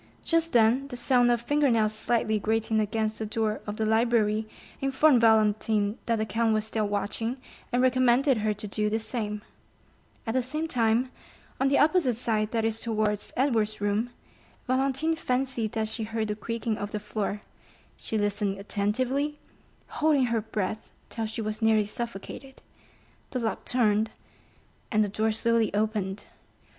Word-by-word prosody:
Just 330 0 +1
then 240 +4 +4
the 250 -3 -7
sound 245 0 +3
of 240 -1 +2
finger 290 +2 +2
nails 215 -2 +2
slightly 220 -1 +1
grating 220 +1 0
against 215 +1 -1
the 220 - -2
door 215 0 -1
of 210 0 -4
the 220 - 0
library 220 -1 +2 0.3
informed 270 -1 +4
Valentine 215 -1 +3
that 230 - +2
the 215 -1 -1
count 225 0 +1
was 215 0 0
still 220 -1 -1
watching, 215 +4 -2 0.3
and 245 +1 +2
recommended 255 +1 +4
her 215 0 0
to 210 0 -5
do 210 +1 -1
the 220 - +1
same; 215 -2 -4 0.8
at 225 - -2
the 260 - +2
same 305 +6 -2
time, 240 -1 +1 0.5
on 270 - +3
the 275 - +3
opposite 300 -4 +3
side, 215 -2 0
that 225 -1 0
is 225 0 -1
towards 215 -2 -1
Edward's 225 -5 +1
room, 205 +4 0 0.6
Valentine 270 +5 +1
fancied 250 -6 -1
that 220 -2 -1
she 225 - -5
heard 220 0 -2
the 210 - -1
creaking 225 +1 -3
of 205 - -3
the 210 - -3
floor; 210 0 -3 0.5
she 220 - -4
listened 205 -1 0
attentively, 255 +9 -1 0.5
holding 295 -4 +2
her 230 -2 0
breath 210 0 -4 0.2
till 225 -1 -3
she 220 +1 -4
was 215 +2 -4
nearly 220 -1 +4
suffocated; 235 +4 -7 0.7
the - - -3
lock 230 -3 -2
turned, 220 -3 +2 0.8
and 215 -2 +3
the 205 - -1
door 220 +2 0
slowly 225 0 +1
opened. 205 -2 -1
225 Hz, 160 wpm, -27 LUFS, 215-250 Hz, 0.8 s, then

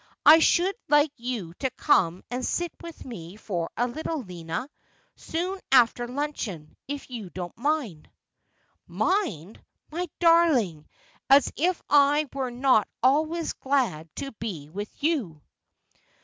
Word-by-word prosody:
I 315 +2 +10
should 355 +4 +3 0.2
like 295 0 +4
you 235 -9 -5
to 265 - 0
come 185 - +2
and 250 +1 -3
sit 345 +5 -1
with 335 -1 -10
me 180 -7 -8
for 180 -6 -4
a 245 - +1
little, 310 +3 -4
Lina, 170 +3 -5 0.5
soon 360 +4 -3
after 240 -1 +4
luncheon, 245 - -4
if 280 -1 -6
you 220 -7 -6
don't 175 -1 -7
mind.' 250 - -2 0.5
' - - -43
Mind! 225 - -1 0.3
My 350 +2 -3
darling, 310 - +3 0.4
as 275 +1 +5
if 355 +2 +1
I 290 +1 +4
were 265 -2 -2
not 245 -3 +3 0.2
always 315 +5 +2
glad 250 - -1
to 275 -1 -5
be 170 -10 -5
with 205 +5 -5
you.' 255 - 0
255 Hz, 135 wpm, -26 LUFS, 190-305 Hz, 0.5 s, I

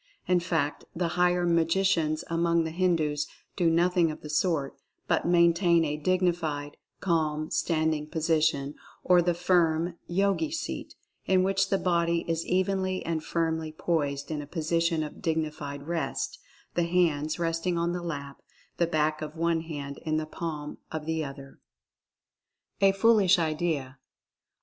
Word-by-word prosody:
In 180 -1 +4
fact, 160 -4 -1
the 170 0 0
higher 180 +1 +2
magicians 165 -1 +2
among 170 0 +2
the 160 - -3
Hindus 160 -4 +1 0.3
do 175 -3 +3
nothing 170 +1 +3
of 155 - -7
the 150 - -7
sort, 155 -3 0 0.3
but - - +1
maintain 170 -1 +4
a 150 -1 -1
dignified, 160 -3 0 0.3
calm, 155 -3 0
standing 155 -2 0
position, 155 -3 +1 0.3
or 180 -1 +5
the 175 0 +1
firm 170 -1 +1
"Yogi 200 - +1
seat," 320 +1 -5 0.3
in 185 -1 +4
which 195 0 +1
the 195 - +2
body 170 -2 +1
is 165 0 -1
evenly 185 0 0
and 165 -1 -2
firmly 160 -1 -1
poised 145 -3 -1
in 150 -1 -2
a 145 - -9
position 165 0 0
of 150 - -8
dignified 150 -3 -2
rest, 165 +1 -3 0.3
the 175 - +1
hands 160 -4 +1
resting 170 +1 -1
on 170 +1 0
the 180 - -3
lap, 140 -5 -6 0.4
the 170 - +2
back 155 -1 0
of 155 +1 -6
one 165 0 +1
hand 145 -4 -6
in 155 -1 -1
the 155 - -1
palm 155 -2 -5
of 155 -1 -4
the 160 0 -1
other. 140 -1 -9 1.2
A 195 0 +6
FOOLISH 200 -2 +4
IDEA. 155 -5 -1
165 Hz, 145 wpm, -28 LUFS, 155-175 Hz, 1.2 s, A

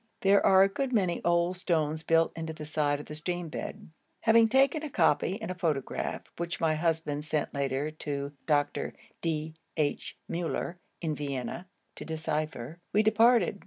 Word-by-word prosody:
There 200 +1 +5
are 190 0 +7
a - - +5
good 255 +7 -2
many 190 -7 +1
old 170 +1 +2
stones 160 -4 0
built 165 0 +3
into 160 -1 -4
the 155 -1 -8
side 150 -1 0
of 150 - -8
the - - -8
stream 175 +2 -3
bed. 155 - -6 0.3
Having 225 0 +5
taken 270 +5 +4
a 305 - -4
copy 170 - +2
and 220 -4 -4
a - - -1
photograph, 160 -7 -2
which 170 0 -3
my 160 -1 +2
husband 155 -2 0
sent 155 -1 -2
later 140 +1 -1
to 140 -2 -4 0.2
Dr. 145 -2 +1 0.3
D. 160 -1 -2 0.2
H. 150 -2 -1
Müller, 170 +1 -2 0.3
in 160 -2 0
Vienna, 145 +4 -4 0.3
to - - -6
decipher, 155 -2 -3
we 210 +2 +4
departed. 225 -1 +4
165 Hz, 165 wpm, -29 LUFS, 150-185 Hz, 0.3 s, are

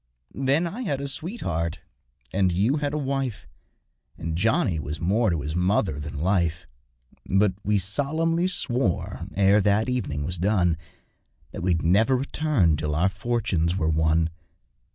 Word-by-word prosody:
Then 135 +5 +1
I 200 +9 -5
had 145 - -1
a 140 - -3
sweetheart 130 - -3 0.5
and 95 -1 +2
you 105 - +2
had 145 -1 -1
a 150 - -2
wife, 135 - -2 0.7
And 80 0 -3
Johnny 90 -3 +1
was 75 +2 -5
more 105 +7 +2
to 85 -4 -1
his 75 +2 -4
mother 90 -3 +1
than 75 -1 -6
life; 85 -3 +1 0.6
But 95 0 +3
we 105 +1 +2
solemnly 155 - 0
swore, 125 - -1
ere 100 +1 +4
that 105 +4 +2
evening 75 -13 -2
was 85 +3 -4
done, 90 -3 +2 0.8
That - - -6
we'd 85 -2 +1
never 110 +10 +4
return 130 - +1
till 75 0 -2
our 90 +5 +3
fortunes 100 -5 -1
were 80 -4 +1
won. 80 +1 +2
95 Hz, 150 wpm, -25 LUFS, 85-130 Hz, 0.8 s, ere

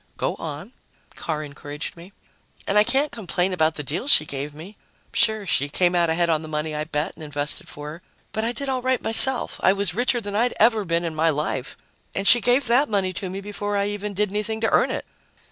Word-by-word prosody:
"Go - - -1
on," - - -7 0.4
Carr 155 -2 -4
encouraged 145 0 -7
me. 175 +3 -13 0.5
"And 200 - -1
I 210 - +7
can't 270 +6 +1
complain 185 -4 -1
about 160 -3 +1
the 150 - -5
deal 150 - -4
she 155 - +5
gave 140 0 -5
me. 165 +8 -11 0.4
Sure, 220 -2 +2
she 145 -5 +1
came 180 +4 +1
out 170 -2 +2
ahead 170 +1 +1
on 160 -2 +1
the 160 - -8
money 155 0 -3
I 150 0 -3
bet 150 -1 -2
and - - -16
invested 145 -1 -3
for 150 0 -8
her. 165 +3 -11 0.3
But 220 - -2
I 230 - 0
did 280 +3 -6
all 260 -1 -1
right 260 -1 +1
myself 245 +3 +5
I 190 - +4
was 200 -2 0
richer 245 +3 +1
than 205 -3 -6
I'd 240 +3 +1
ever 220 -2 +4
been 170 0 0
in 165 - -3
my 160 +1 +2
life 150 -3 -3 0.4
and 195 0 0
she 240 - +8
gave 245 +3 +3
that 250 +5 +3
money 195 -3 0
to 185 +1 -4
me 190 +2 -6
before 205 0 -3
I 200 0 0
even 205 0 -5
did 205 0 0
anything 215 +2 -2
to 225 - +1
earn - - +3
it!" - - -4
190 Hz, 230 wpm, -23 LUFS, 155-220 Hz, 0.5 s, she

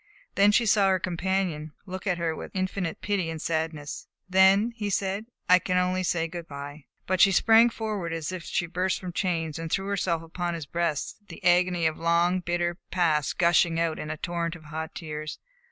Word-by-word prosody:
Then 200 +1 +5
she 235 +3 +3
saw 205 -2 +4
her 190 - +3
companion 180 -3 -2
look 185 +1 -6
at 180 -2 +1
her 165 -2 -1
with - - -9
infinite 185 -2 -2
pity 190 -4 0
and 160 -1 -5
sadness. 160 -2 -3 0.2
"Then," 190 +4 +5
he 210 -2 -3
said, 200 +2 -1 0.2
"I 180 0 +7
can 180 +1 -1
only 180 0 +1
say 170 -2 0
good 170 0 -7
by." 140 0 -8 0.2
But 185 -1 +1
she 195 - +7
sprang 225 +5 +6
forward 215 -7 -4
as 165 0 -3
if 185 -1 -5
she 175 - -1
burst 180 +2 -1
from 180 -2 -6
chains, 165 -4 -1
and 165 -1 -5
threw 195 - 0
herself 185 -4 -1
upon 175 +1 -3
his 165 -3 -6
breast, 170 0 -2
the - - -11
agony 175 -1 +3
of 160 -1 +1
the - - -11
long, 170 +2 +3
bitter 175 0 -1
past 160 -5 +1
gushing 170 -1 +3
in 160 -2 -1
a 155 - -3
torrent 170 0 -3
of 165 - -13
hot 160 +1 -6
tears. 155 -2 -5
175 Hz, 200 wpm, -27 LUFS, 165-190 Hz, 0.2 s, I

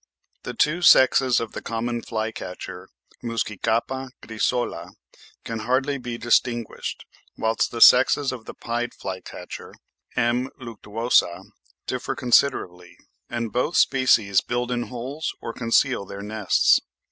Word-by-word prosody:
The 125 - -7
two 150 +8 +1
sexes 130 -6 +6
of 115 -2 -5
the - - -7
common 120 +1 -3
fly 110 -1 -3
catcher 90 -2 -8 0.3
(Muscicapa 115 +3 -2
grisola) 110 -6 -2 0.5
can 115 -1 -5
hardly 130 +5 0
be 120 -2 -5
distinguished, 120 -1 -1 0.3
whilst 110 0 0
the 115 - -6
sexes 130 +3 +6
of 120 -4 -8
the - - -9
pied 120 +1 -3
fly 95 -1 -5
catcher 90 - -9 0.4
(M. 125 +2 +1
luctuosa) 115 -5 0 0.4
differ - - -3
considerably, 90 -9 +1 0.3
and 115 -2 -4
both 150 +8 0
species 110 -7 +4
build 120 0 -2
in 120 -1 -2
holes 130 +5 -5
or 115 - -6
conceal 115 0 +1
their 100 +1 -8
nests. 105 -2 +3
120 Hz, 125 wpm, -24 LUFS, 110-125 Hz, 0.5 s, sexes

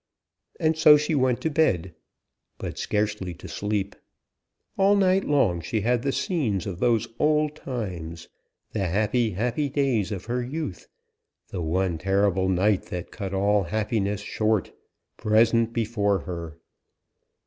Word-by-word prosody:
And 160 -2 +2
so 155 -1 +7
she 150 +2 -1
went 130 -4 +2
to 160 - -1
bed; 95 - +1 0.6
but - - -6
scarcely 105 -4 -1
to - - -11
sleep. 105 -1 -2 0.8
All 195 +1 +4
night 190 -1 +3
long 110 -13 +2
she 110 +6 -2
had 120 +2 +1
the 135 - 0
scenes 130 - -1
of 90 -3 -5
those 115 0 +2
old 150 0 +2
times, 90 - -6 0.4
the 100 -4 -1
happy, 110 +4 +1
happy 125 +9 -1
days 130 -8 0
of 95 -3 -5
her 120 +2 -1
youth, 130 - -5 0.6
the 90 - -4
one 85 +1 0
terrible 95 0 +1
night 95 +2 +2
that 90 -1 -6
cut 100 -3 -5
all 100 +1 +2
happiness 105 +1 -1
short, 110 -1 0 0.5
present 115 +1 +3
before 105 -4 0
her. 85 -2 -6
105 Hz, 135 wpm, -25 LUFS, 95-130 Hz, 0.8 s, so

